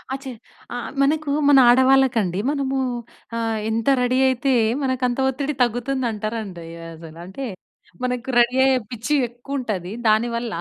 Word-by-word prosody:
అచ. 275 +1 -10 0.5
ఆ! - - -4 0.3
మనకు 300 +1 0 0.2
మన 285 - +7
ఆడవాళ్ళకండి 250 -7 +3
మనమూ 270 -2 -1 0.6
ఆహ్, 225 -1 -1
ఎంత 225 0 -2
రెడీ 250 +1 +1
అయితే 260 +1 0 0.3
మనకంత 255 -1 0
ఒత్తిడి 280 +3 -2
తగ్గుతుందంటారండి 225 -7 -3 0.3
అసలు. 160 0 -12
అంటే 190 +9 -6 0.6
మనకు 250 0 -2
రెడీ 240 +1 +4
అయ్యే 265 -1 +4
పిచ్చి 240 +6 -1
ఎక్కువుంటది 240 -7 -5 0.2
దానివల్ల. 235 +1 +1
245 Hz, 120 wpm, -22 LUFS, 220-265 Hz, 0.6 s, మన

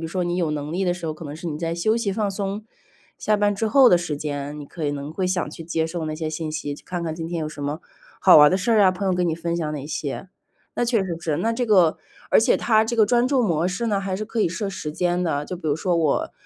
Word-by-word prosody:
如 165 - -4
说 180 +1 -2
你 175 0 -1
有 170 -4 0
能 150 +1 -4
力 190 +2 -1
的 175 - +1
时 175 -1 -9
候， 155 - -1
可 155 - -12
能 145 0 -7
是 170 - -8
你 150 -2 -3
在 165 0 -2
休 215 +6 +1
息 205 -4 -1
放 205 0 -1
松 200 +2 -4 0.5
下 215 0 +1
班 205 0 +2
之 220 +2 -1
后 265 0 +6
的 175 - +6
时 160 -4 -3
间， 145 0 -4
你 145 - -7
可 155 +1 -5
以 - - +1
能 145 +1 -5
会 185 +1 -1
想 180 -4 -1
去 165 - -9
接 160 0 -1
受 165 -1 -4
那 155 - -3
些 155 0 -3
信 155 0 -4
息。 155 -2 -4
去 - - -14
看 175 -2 -4
看 160 -1 -3
今 165 0 -5
天 170 - -3
有 - - -2
什 145 -1 -7
么， 145 +4 -3 0.4
好 - - +9
玩 150 0 +8
的 185 - +2
事 195 +5 -1
儿 220 -2 +5
啊， 190 -2 +6
朋 190 +2 -4
友 185 - +2
跟 180 -1 +1
你 160 - 0
分 170 0 -3
享 160 -3 -2
哪 145 -1 -6
些。 155 +4 -4 0.5
那 - - 0
确 230 -5 +1
实 175 -3 -3
是 155 -4 -1
那 230 +1 0
这 245 +1 -1
个 185 -7 +4 0.3
而 - - +6
且 240 - +3
它 220 -2 +3
这 235 +1 -2
个 220 - +6
专 240 +3 +2
注 265 -3 +2
模 170 0 +1
式 195 +6 -3
呢， 205 -3 0
还 195 -1 -3
是 215 - -4
可 225 +1 -3
以 175 - +3
设 195 +4 -3
时 160 -6 -5
间 175 +2 0
的， 150 -4 -1
就 180 - -5
比 160 - -4
如 145 - +1
说 175 +1 0
我 160 -4 +1
175 Hz, 330 characters per minute, -23 LUFS, 155-200 Hz, 0.5 s, 好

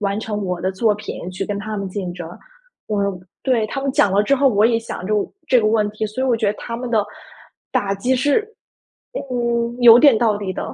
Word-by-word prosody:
完 200 0 -1
成 210 -2 -4
我 180 -2 -3
的 185 - -1
作 210 +3 +1
品 205 -3 -7
去 185 - -4
跟 205 -1 -3
他 215 +1 -5
们 200 -1 -4
竞 185 -2 -4
争。 175 -2 -7 0.6
我 210 -2 -1 0.4
对， 245 -5 +1
他 275 - -4
们 275 0 -1
讲 200 - +3
了 200 +1 +3
之 275 +7 +2
后， 275 +1 +2
我 210 -3 +2
也 230 -1 +2
想 225 -5 -7
这 215 - 0 0.3
这 255 - +5
个 215 - +1
问 215 -1 +2
题， 215 +1 -3
所 215 +5 -4
以 - - +1
我 245 -3 +2
觉 225 -2 -1
得 200 - +2
他 230 - -5
们 245 0 -5
的 215 -3 +2 0.7
打 195 -1 0
击 245 +7 0
是， 280 - +2 0.9
嗯， 235 -1 -1
有 235 -1 +9
点 280 -3 +6
道 220 -3 +2
理 200 -2 -4
的。 - - -5
215 Hz, 250 characters per minute, -20 LUFS, 200-240 Hz, 0.9 s, 有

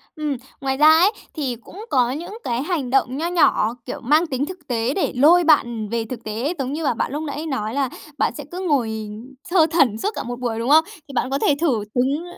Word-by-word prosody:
Ừm, 300 -4 -2 0.2
ngoài 265 -1 -1
ra 300 +2 +6
ấy, 335 +6 +6 0.2
thì 275 -6 -2
cũng 420 +4 -10
có 250 -2 +2
những 340 +10 -6
cái 240 0 -1
hành 305 -6 -2
động 260 0 +1
nho 325 +3 -1
nhỏ, 315 -10 +3
kiểu, - - -5
mang 300 +8 +3
tính 275 -1 -1
thực 340 -3 -10
tế 235 +1 0
để 380 - -1
lôi 325 +7 +6
bạn, 310 -5 +5
ừm, 230 -3 -5
về 230 0 -1
thực 230 0 -7
tế. 230 +9 -2
Giống 265 0 -2
như 320 +2 -3
là, 280 - +2
bạn 230 - -2
lúc 295 +3 -3
nãy 300 +1 -4
nói 225 -8 -3
là 275 -1 0 0.3
bạn - - +1
sẽ 295 - -6
cứ 360 - -5
ngồi, 290 -11 +1 0.2
ừm, 215 +3 -9 0.2
thơ 345 -3 +5
thẩn 275 -10 +3
suốt 400 - -1
cả - - -3
một 245 +1 -6
buổi, 235 -3 -2
đúng 235 +3 -2
không? 315 +2 +7 0.2
Thì 280 - -11
bạn 255 0 0
có 275 +1 -1
thể 290 - +3
thử 255 -11 +1
đứng 270 +6 +1
275 Hz, 250 wpm, -21 LUFS, 245-315 Hz, 0.3 s, không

